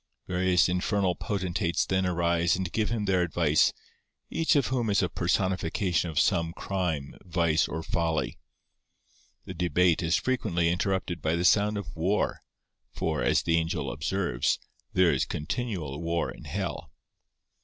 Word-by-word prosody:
Various 90 -1 +2
infernal 90 +1 +1
potentates 90 -2 -1
then 95 0 +1
arise 85 0 +2
and 90 -2 -3
give 110 -1 0
him 110 -2 -1
their 95 -2 +2
advice, 80 -3 +3 0.6
each 165 -1 +2
of 140 -4 +3
whom 125 -4 -1
is 100 -1 +3
a 90 - 0
personification 90 -1 0
of 80 -2 0
some 85 +3 +2
crime, 85 -9 -3
vice, 85 -2 +1
or 80 +1 -4
folly. 80 -1 -1 1.1
The - - -6
debate 90 0 +2
is 85 0 +2
frequently 95 -10 0
interrupted 90 -2 -1
by 80 +2 +1
the 85 +1 0
sound 105 +3 +4
of 95 -4 -6
war; 90 +6 0 0.5
for, - - -2
as - - +2
the 85 0 +2
angel 85 +1 -1
observes, 75 -2 0 0.3
there 90 -2 +4
is 65 - +1
continual 85 - -4
war 85 0 -1
in - - -12
hell. - - -4
90 Hz, 145 wpm, -28 LUFS, 85-95 Hz, 1.1 s, sound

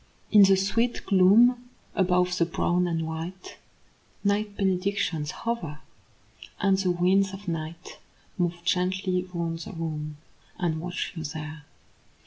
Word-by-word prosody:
In 210 - +8
the 195 -1 +7
sweet 230 +5 0
gloom 235 +6 +5 0.2
above 180 -1 +2
the 170 - +4
brown 175 +1 +1
and 165 -1 -1
white 165 +4 -7 0.6
Night 205 0 0
benedictions 185 -5 0
hover; 230 -11 -4 0.8
and 195 -1 +3
the 190 -2 +1
winds 185 +2 +2
of 195 +1 -9
night 165 +1 -5 0.4
Move 175 -1 -2
gently 180 0 0
round 165 -2 -3
the 170 - -8
room, 155 -3 -4 0.4
and 160 -3 -1
watch 180 +1 -4
you 160 - -5
there. 150 0 -6
180 Hz, 125 wpm, -26 LUFS, 165-195 Hz, 0.8 s, In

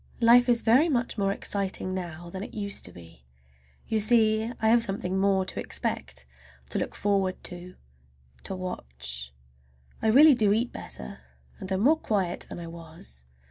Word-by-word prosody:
Life 245 +2 +6
is 235 -1 +3
very 260 +9 +5
much 245 -4 0
more 195 0 +2
exciting 195 -2 -2
now 175 -2 -6
than 190 - -6
it - - -9
used 200 -2 -2
to 90 - -10
be. 85 -7 -15 0.6
You 220 - +1
see 220 0 +3
I 220 - +2
have 235 +1 +5
something 195 -4 -2
more 195 -1 +2
to - - -2
expect, 65 -1 -4 0.5
to - - -1
look - - -4
forward 195 -2 0
to, 180 0 -7 0.7
to 190 - -4
watch. 65 - -5 0.7
I - - +1
really 285 +7 +8
do 215 -5 +3
eat 235 +3 0
better, 65 +1 -6 0.4
and 190 - -5
am 190 0 0
more 300 +8 +5
quiet 190 - -2
than - - -7
I 170 - -7
was. 160 - -8
195 Hz, 170 wpm, -27 LUFS, 170-220 Hz, 0.7 s, really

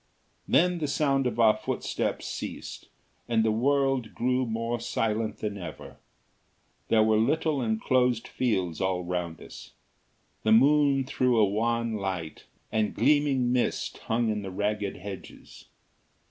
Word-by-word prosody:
Then 180 0 +3
the 150 - -1
sound 140 -2 +1
of 120 - -4
our 110 -2 +6
footsteps - - -3
ceased - - -6 0.4
and 110 -1 +2
the 110 - +3
world 135 0 +1
grew 125 +1 0
more 115 +1 -2
silent 110 -1 -1
than 105 -2 -4
ever. 85 - -9 0.9
There 110 -1 +4
were 110 0 +3
little 145 +4 +1
enclosed 120 +1 +1
fields 95 -10 -1
all 95 -1 0
round 85 -2 -3
us. - - -12 0.7
The 110 - +3
moon 140 +2 +4
threw 125 -2 +1
a 110 - +6
wan 115 +2 0
light, 95 -5 -5 0.3
and 110 -1 0
gleaming 140 -4 +2
mist 125 - -1
hung 115 0 0
in 105 -1 -1
the 95 - -6
ragged 105 +1 -2
hedges. 95 0 -10
115 Hz, 135 wpm, -27 LUFS, 105-130 Hz, 0.9 s, our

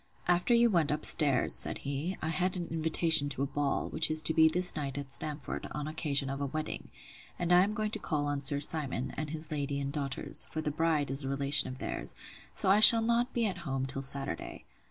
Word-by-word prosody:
After 180 +7 +2
you 235 0 +3
went 165 -6 +1
up 150 +1 -1
stairs, 140 -6 +5
said - - +1
he, 145 +7 -4
I 155 - -2
had 185 +2 -2
an 175 - -4
invitation 160 -2 +2
to 135 0 -3
a - - 0
ball, 145 0 -3
which 155 0 +3
is 155 0 +3
to 160 - +4
be 160 0 +5
this 180 +3 +4
night 140 -3 -5
at 140 -1 -7
Stamford, 150 -1 -3
on 150 0 -5
occasion 150 -3 -1
of 135 +1 -5
a 140 - -2
wedding; 155 +3 -6 0.5
and 175 0 0
I 180 +1 +6
am 210 +2 -3
going 215 -1 -3
to 220 - -4
call 150 -6 -3
on 145 -1 -3
Sir 140 0 +2
Simon, 140 -4 -2
and 155 -1 -5
his 160 +1 -6
lady 140 -1 -3
and 140 0 -5
daughters; 140 -3 -4
for 155 - -7
the 155 -1 -3
bride 155 -3 -1
is 135 +1 +2
a 135 - -5
relation 140 +1 +2
of 130 - -8
theirs: - - -4 0.4
so - - -3
I 195 +2 +4
shall 225 +1 +8
not 235 +2 0
be 235 -1 -1
at 185 -4 -3
home 135 -5 -4
till 135 +1 -4
Saturday. 135 -9 -3
155 Hz, 235 wpm, -29 LUFS, 140-170 Hz, 0.5 s, shall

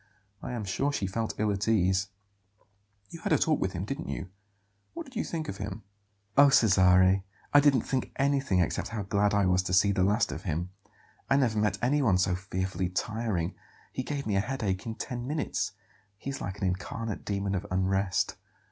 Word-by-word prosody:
I 125 - -5
am 115 -4 -3
sure 135 +9 0
she 105 - -2
felt 110 +4 -2
ill 105 0 +2
at 100 +2 -2
ease." 95 -3 +2 1.0
"You 165 - -9
had - - -2
a - - +6
talk 155 -2 +1
with 95 - -1
him, 90 +1 -3
didn't 135 +8 -5
you? 95 - -4 0.7
What 335 - -4
did 265 -2 -15
you 225 - 0
think 160 -2 -4
of 95 - -5
him?" 100 +1 -6 0.5
"Oh, 140 0 +8
Cesare, 95 -4 +5 0.3
I 145 - +9
didn't 140 -4 +4
think 130 -1 -2
anything 135 -9 +2
except 85 - -1
how 110 -2 -4
glad 100 +1 +1
I 100 -1 +3
was 90 0 +3
to 90 0 -4
see 100 +2 +5
the 95 -1 0
last 105 +4 +2
of - - -5
him. 85 -1 -3 0.6
I 135 - +4
never 115 -6 +2
met 105 -1 +1
anyone 125 -7 +3
so 90 0 +2
fearfully 95 0 -2
tiring. 105 -3 -2 0.4
He - - -2
gave 140 +1 -4
me 105 - 0
a - - +3
headache 105 -4 -2
in 110 - -3
ten 120 0 -5
minutes. 150 +2 -2 0.4
He 135 - -5
is 135 - -6
like 95 +1 -4
an 100 - -2
incarnate 100 +4 -3
demon 100 -1 -2
of 95 - -2
unrest." 95 +1 0
100 Hz, 200 wpm, -29 LUFS, 95-125 Hz, 1.0 s, I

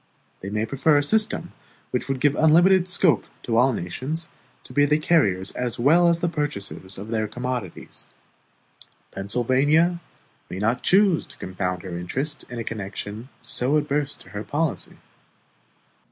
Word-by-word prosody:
They 95 - -6
may 105 +2 -1
prefer 140 +5 +2
a 145 - +2
system 215 +8 +1 0.4
which 125 - -2
would 135 -1 -2
give 145 +1 +3
unlimited 175 +5 +5
scope 180 -3 +3 0.2
to 115 - -1
all 125 +3 +5
nations 135 - -4 0.3
to - - -12
be 145 0 +4
the 150 +1 +3
carriers 105 - +2
as 125 -2 -3
well 160 +8 +5
as 170 0 +1
the 175 - +1
purchasers 140 - -4
of 100 +3 -8
their 110 -1 -1
commodities. 125 -5 -6 1.1
Pennsylvania 135 - +1 0.5
may 90 - -6
not 110 +5 0
choose 190 -3 +3
to - - -12
confound 90 0 -4
her 90 -2 -6
interests 135 - -3
in 120 - -7
a 115 - -3
connection 105 +2 -6
so 130 +4 0
adverse 145 -1 -1
to - - -15
her 105 +2 -6
policy. 150 +4 -2
130 Hz, 155 wpm, -24 LUFS, 105-155 Hz, 1.1 s, unlimited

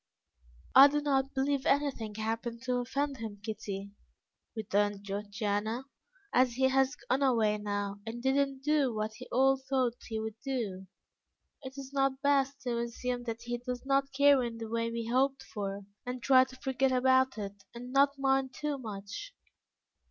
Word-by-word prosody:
"I 275 +1 +10
do 295 +1 0
not 275 -2 0
believe 270 0 +1
anything 275 -7 0
happened 230 +2 -3
to 250 -1 0
offend 275 +3 -1
him, 220 -3 -6
Kitty," 200 -2 -5 0.6
returned 205 -2 0
Georgiana. 205 +3 -2 0.5
"As 250 -1 +4
he 265 +2 +3
has 270 +1 +2
gone 265 -1 -1
away 225 -6 +3
now 205 -1 -3
and 230 +2 -6
did 265 0 +3
not 275 -1 0
do 295 -3 +2
what 215 0 -2
he - - -9
all 270 +2 +4
thought 260 -2 0
he 220 -2 -3
would 220 0 -5
do, 215 -9 -3 0.8
is 265 +1 -8
it 275 0 -8
not 270 -1 +1
best 275 -1 +2
to 240 -2 -1
assume 245 +1 -3
that 230 0 -4
he 240 0 -3
does 250 +1 -5
not 275 0 +2
care 280 0 +5
in 235 -2 -3
the 225 -1 -6
way 230 0 -1
we 230 0 -3
hoped 265 +3 +1
for, 200 -1 -5 0.2
and 250 -1 -5
try 260 -1 +6
to 260 0 -13
forget 265 0 0
about 260 0 +3
it, 200 -1 -6
and 245 +2 -8
not 280 +1 +4
mind 270 -1 +1
too 300 -2 -2
much? 215 - -7
250 Hz, 170 wpm, -31 LUFS, 220-270 Hz, 0.8 s, I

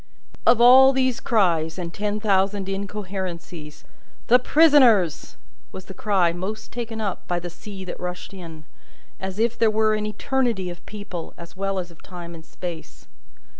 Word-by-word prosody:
Of 240 - +6
all 260 +3 +8
these 260 -2 +1
cries, 170 -7 +1
and 170 -2 -5
ten 210 0 -2
thousand 195 -1 +1
incoherences, 190 -6 -6 0.5
"The 250 +2 +7
Prisoners!" 250 - +4 0.3
was 190 - -9
the 190 - -10
cry 190 -5 +1
most 195 +5 -6
taken 230 -2 -5
up 200 -4 -4
by 175 - -1
the 175 0 -7
sea 195 +1 -9
that 180 - -7
rushed 180 +2 -6
in, 165 -4 -10 0.6
as 190 0 -5
if 230 +1 0
there 225 - +4
were 215 0 +2
an 215 0 -1
eternity 225 -5 -1
of 175 - -11
people, 200 -5 -7
as 170 -1 -12
well 195 0 -2
as 180 -2 -4
of 165 - -19
time 175 -2 -9
and 165 -1 -11
space. 170 -1 -9
195 Hz, 165 wpm, -23 LUFS, 175-220 Hz, 0.6 s, all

